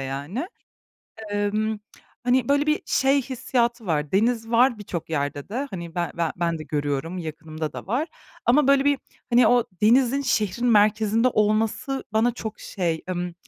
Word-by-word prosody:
yani. 145 Hz, -, -4 dB, 0.8 s
Emm, 210 Hz, +1 st, 0 dB, 0.5 s
hani, 250 Hz, 0 st, +2 dB
böyle 285 Hz, +1 st, +3 dB
bir 305 Hz, +1 st, +1 dB
şey 275 Hz, +1 st, +3 dB
hissiyatı 240 Hz, -3 st, -1 dB
var. 150 Hz, -3 st, -1 dB
Deniz 225 Hz, +2 st, +1 dB
var 240 Hz, 0 st, +4 dB
birçok 175 Hz, -5 st, -6 dB
yerde 145 Hz, 0 st, -2 dB
de. 260 Hz, +7 st, -3 dB
Hani, 170 Hz, -3 st, -7 dB
be 175 Hz, -1 st, -1 dB
ben 165 Hz, -2 st, 0 dB
ben 170 Hz, -1 st, -1 dB
de 155 Hz, -, -6 dB
görüyorum, 145 Hz, +4 st, -2 dB
yakınımda 155 Hz, -1 st, -5 dB
da -, -, -8 dB
var. 255 Hz, -, -1 dB, 0.4 s
Ama 265 Hz, +3 st, +4 dB
böyle 275 Hz, 0 st, +5 dB
bir, 285 Hz, -1 st, +3 dB, 0.3 s
hani, 240 Hz, +1 st, +5 dB
o 245 Hz, -1 st, +4 dB, 0.2 s
denizin 255 Hz, +4 st, +4 dB
şehrin 240 Hz, -2 st, 0 dB
merkezinde 215 Hz, +2 st, +4 dB
olması 220 Hz, +5 st, 0 dB
bana 230 Hz, +2 st, +2 dB
çok 220 Hz, -3 st, -6 dB
şey, 170 Hz, -5 st, -2 dB
ımm, 175 Hz, -1 st, -3 dB
215 Hz, 155 wpm, -24 LUFS, 170-245 Hz, 0.8 s, böyle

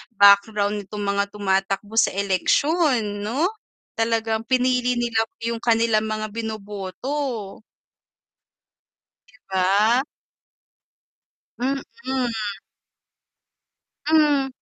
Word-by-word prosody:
background 200 Hz, +1 st, +5 dB
nitong 205 Hz, +1 st, -6 dB
mga 200 Hz, 0 st, +1 dB
tumatakbo 195 Hz, +1 st, -1 dB
sa 225 Hz, -, +4 dB
eleksyon, 210 Hz, -, +1 dB
'no? 265 Hz, +11 st, +1 dB, 0.5 s
Talagang 225 Hz, -1 st, 0 dB
pinili 250 Hz, 0 st, +1 dB
nila 235 Hz, -2 st, +1 dB, 0.2 s
yung 235 Hz, 0 st, -2 dB
kanilang 225 Hz, -2 st, +3 dB
mga 215 Hz, 0 st, -3 dB
bino-boto. 220 Hz, +2 st, -4 dB, 1.8 s
'Di -, -, -71 dB
ba? 205 Hz, +6 st, +3 dB, 1.6 s
Mm. 270 Hz, +3 st, 0 dB, 2.3 s
Hmm. 300 Hz, -3 st, +3 dB
220 Hz, 75 wpm, -23 LUFS, 200-250 Hz, 2.3 s, background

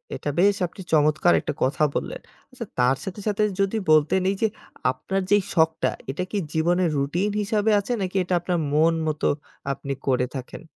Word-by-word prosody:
এটা 145 Hz, -, -4 dB
বেশ 200 Hz, +2 st, +5 dB
আপনি 190 Hz, -, -12 dB
চমৎকার 155 Hz, +2 st, +4 dB
একটা -, -, -3 dB
কথা 140 Hz, +3 st, +1 dB
বললেন। -, -, -3 dB, 0.3 s
আচ্ছা, -, -, -7 dB
তার 125 Hz, +2 st, +3 dB
সাথে, 190 Hz, +2 st, -6 dB
সাথে 210 Hz, 0 st, +1 dB, 0.2 s
যদি 195 Hz, +3 st, +1 dB
বলতে 155 Hz, +2 st, +4 dB
নেই 195 Hz, +1 st, +2 dB
যে, 220 Hz, -, +4 dB, 0.4 s
আপনার 190 Hz, +9 st, -3 dB
যে, 205 Hz, -, +7 dB, 0.2 s
শখটা, 160 Hz, -2 st, +2 dB, 0.2 s
এটা 180 Hz, +6 st, -3 dB
কি 210 Hz, -, -1 dB, 0.2 s
জীবনে 175 Hz, +3 st, +2 dB
রুটিন 170 Hz, +9 st, 0 dB
হিসাবে 215 Hz, +1 st, +1 dB
আছে 200 Hz, -, -5 dB
নাকি 185 Hz, 0 st, -3 dB
এটা 180 Hz, -, -3 dB
আপনার 175 Hz, 0 st, -1 dB, 0.2 s
মন 160 Hz, +2 st, +4 dB
মতো 155 Hz, -1 st, 0 dB, 0.4 s
আপনি 140 Hz, +1 st, -4 dB
করে 125 Hz, -1 st, +2 dB
থাকেন। 130 Hz, +6 st, -7 dB
175 Hz, 180 wpm, -24 LUFS, 150-195 Hz, 0.4 s, যে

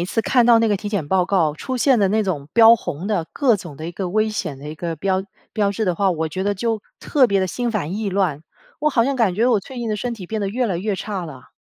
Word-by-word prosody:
一 175 Hz, -, 0 dB
次 225 Hz, +4 st, -1 dB
看 245 Hz, +1 st, +3 dB
到 235 Hz, -1 st, +7 dB
那 225 Hz, -, +2 dB
个 205 Hz, -, +2 dB
体 205 Hz, -, -5 dB
检 200 Hz, -8 st, -2 dB
报 185 Hz, 0 st, +3 dB
告 170 Hz, -6 st, +2 dB
出 255 Hz, +11 st, -5 dB
现 250 Hz, -1 st, +3 dB
的 200 Hz, -, +3 dB
那 215 Hz, +3 st, +2 dB
种 155 Hz, -8 st, -3 dB
标 230 Hz, 0 st, +8 dB
红 175 Hz, -5 st, -5 dB
的， 195 Hz, -6 st, -1 dB
各 260 Hz, -5 st, +2 dB
种 175 Hz, -7 st, -10 dB
的 160 Hz, -, -7 dB
一 175 Hz, -, -6 dB
个 185 Hz, +1 st, -4 dB
危 215 Hz, +4 st, +1 dB
险 160 Hz, -10 st, -4 dB
的 140 Hz, -, -10 dB
一 155 Hz, -, -6 dB
个 165 Hz, 0 st, -4 dB
标 190 Hz, +3 st, 0 dB, 0.3 s
标 205 Hz, -2 st, +1 dB
志 215 Hz, +2 st, -2 dB
的 180 Hz, -, +1 dB
话， 195 Hz, +2 st, +2 dB
我 160 Hz, -2 st, -1 dB
觉 185 Hz, +4 st, -4 dB
得 205 Hz, +1 st, 0 dB
就 225 Hz, +2 st, -1 dB, 0.2 s
特 270 Hz, -4 st, +3 dB
别 200 Hz, -2 st, +1 dB
地 190 Hz, -, +1 dB
心 240 Hz, +6 st, -2 dB
烦 185 Hz, -6 st, -2 dB
意 215 Hz, 0 st, -2 dB
乱， 185 Hz, -7 st, 0 dB, 0.4 s
我 300 Hz, -, +2 dB
好 235 Hz, -5 st, +3 dB
像 275 Hz, +2 st, 0 dB
感 225 Hz, -8 st, +1 dB
觉 225 Hz, +5 st, +2 dB
我 230 Hz, -5 st, +3 dB
最 255 Hz, +5 st, -10 dB
近 235 Hz, -, -3 dB
的 210 Hz, -, -1 dB
身 240 Hz, +3 st, -3 dB
体 190 Hz, -6 st, -9 dB
变 220 Hz, +2 st, -3 dB
得 200 Hz, -, -1 dB
越 245 Hz, +5 st, -1 dB
来 185 Hz, -6 st, -2 dB
越 200 Hz, +2 st, -2 dB
差 195 Hz, -2 st, -4 dB
了。 135 Hz, -5 st, -12 dB
200 Hz, 320 characters per minute, -21 LUFS, 175-225 Hz, 0.4 s, 标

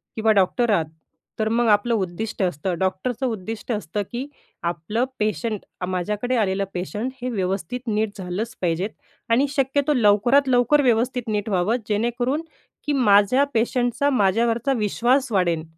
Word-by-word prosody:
किंवा 220 Hz, 0 st, +2 dB
डॉक्टर 215 Hz, +4 st, +2 dB
आहात, 165 Hz, -6 st, +2 dB, 0.5 s
तर 220 Hz, 0 st, +1 dB
मग 235 Hz, +1 st, +2 dB
आपलं 215 Hz, +3 st, +3 dB
उद्दिष्ट 200 Hz, +1 st, -3 dB
असतं 175 Hz, +1 st, -1 dB
डॉक्टरचं 205 Hz, +7 st, -1 dB
उद्दिष्ट 225 Hz, 0 st, -4 dB
असतं, 210 Hz, -2 st, -2 dB
की 250 Hz, +3 st, -4 dB, 0.4 s
आपलं 170 Hz, +8 st, -1 dB
पेशंट, 215 Hz, 0 st, -1 dB, 0.3 s
माझ्याकडे 210 Hz, +7 st, -1 dB
आलेलं 195 Hz, -2 st, +1 dB
पेशंट 210 Hz, +7 st, -3 dB
हे 255 Hz, -, -2 dB
व्यवस्थित 195 Hz, +1 st, -2 dB
नीट 215 Hz, -1 st, -1 dB
झालंच 195 Hz, +5 st, -4 dB
पाहिजेत. 175 Hz, +3 st, 0 dB, 0.4 s
आणि 260 Hz, +5 st, +3 dB
शक्यतो 280 Hz, +2 st, +1 dB
लवकरात-लवकर 245 Hz, +5 st, +4 dB
व्यवस्थित 245 Hz, 0 st, +1 dB
नीट 210 Hz, 0 st, -1 dB
व्हावं 190 Hz, +4 st, +1 dB
जेणेकरून, 240 Hz, +7 st, 0 dB, 0.4 s
की 295 Hz, -, 0 dB
माझ्या 245 Hz, +1 st, +4 dB
पेशंटचा 245 Hz, +4 st, +1 dB
माझ्यावरचा 230 Hz, +3 st, +2 dB
विश्वास 240 Hz, +5 st, +1 dB
वाढेन. 175 Hz, -5 st, +1 dB
220 Hz, 135 wpm, -23 LUFS, 195-245 Hz, 0.5 s, लवकरात-लवकर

